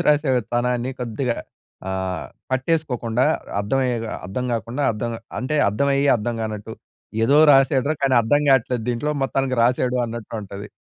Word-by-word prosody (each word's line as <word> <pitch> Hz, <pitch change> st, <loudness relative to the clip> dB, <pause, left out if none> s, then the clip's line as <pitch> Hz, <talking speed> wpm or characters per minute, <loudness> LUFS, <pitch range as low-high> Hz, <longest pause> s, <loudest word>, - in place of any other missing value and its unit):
సోది -, -, -1 dB
రాసే 150 Hz, -2 st, +3 dB, 0.2 s
తనాన్ని 125 Hz, +1 st, 0 dB
కొద్దిగా 120 Hz, +1 st, -2 dB, 0.5 s
ఆహ్, 95 Hz, -1 st, -3 dB, 0.3 s
పట్టేసుకోకుండా 130 Hz, -4 st, 0 dB, 0.4 s
అర్థమయ్యే 125 Hz, +3 st, 0 dB, 0.3 s
అర్థం 100 Hz, +7 st, -3 dB
గాకుండా. 115 Hz, +5 st, -2 dB
అర్థం 115 Hz, +2 st, -3 dB, 0.3 s
అంటే 130 Hz, +5 st, -1 dB
అర్థమయ్యి 140 Hz, +6 st, +1 dB
అర్థం 115 Hz, +2 st, -3 dB
గానట్టు. 110 Hz, 0 st, -5 dB, 0.5 s
ఏదో 140 Hz, +5 st, +4 dB
రాసాడురా 135 Hz, +1 st, +4 dB
కానీ 135 Hz, -2 st, +3 dB
అర్థం 145 Hz, +6 st, +3 dB
కావట్లేదు 125 Hz, -3 st, +3 dB
దీంట్లో. 125 Hz, +5 st, -1 dB
మొత్తానికి 135 Hz, -1 st, 0 dB
రాసాడు 125 Hz, +1 st, +2 dB
అన్నట్టు 115 Hz, -1 st, -7 dB
ఉంటది. 100 Hz, +1 st, -8 dB
125 Hz, 135 wpm, -22 LUFS, 115-135 Hz, 0.5 s, ఏదో